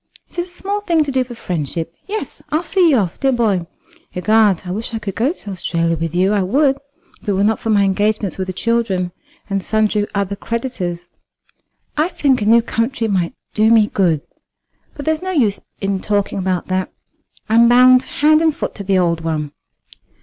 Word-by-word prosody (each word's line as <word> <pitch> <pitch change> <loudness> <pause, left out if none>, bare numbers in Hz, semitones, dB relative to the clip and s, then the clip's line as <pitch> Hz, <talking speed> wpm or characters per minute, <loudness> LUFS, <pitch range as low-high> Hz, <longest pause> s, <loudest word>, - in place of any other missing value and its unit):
"It - - -5
is 350 - -1
a 355 - -13
small 400 +3 -3
thing 340 -6 +2
to 285 - -3
do 260 -1 +1
for 245 -1 -10
friendship. 165 - -4
Yes, 430 +2 -5
I'll 310 +3 0
see 360 -2 +3
you 280 - +4
off, 185 -6 -1
dear 270 -1 +2
boy. 210 -8 +1 0.5
Egad, 205 0 +3
I 180 - -4
wish 220 +4 -4
I - - 0
could 210 -3 -5
go 245 +9 +1
to 210 - -8
Australia 170 -2 -1
with 165 +1 -4
you. 190 +3 +3
I 205 - +2
would, 270 +8 +2 0.4
if - - -6
it - - +2
were 195 +1 +1
not 220 +1 +2
for 225 - -4
my 205 -2 +4
engagements 205 0 0
with 190 - -2
the - - -2
children 195 -4 0 0.4
and 195 -1 -1
sundry 210 +1 +1
other 200 0 -1
creditors. 195 -7 -4 0.9
I 305 +2 +3
think 275 -8 +1
a 205 - 0
new 230 +1 +5
country 230 +1 -1
might 185 -5 -1 0.2
do 220 +1 +3
me 225 -2 +6
good. 170 -6 +2 0.7
But 285 - -7
there's 315 0 0
no 375 - -4
use 240 - +1 0.2
in 195 -1 -1
talking 205 -1 -1
about 185 -2 -1
that. 185 0 -1 0.6
I'm 230 +1 +5
bound 255 +1 +7
hand 310 0 +2
and 320 -2 +2
foot - - -4
to 200 - -5
the 195 0 +1
old 170 -2 +1
one." 155 -3 -2
215 Hz, 200 wpm, -18 LUFS, 185-260 Hz, 0.9 s, bound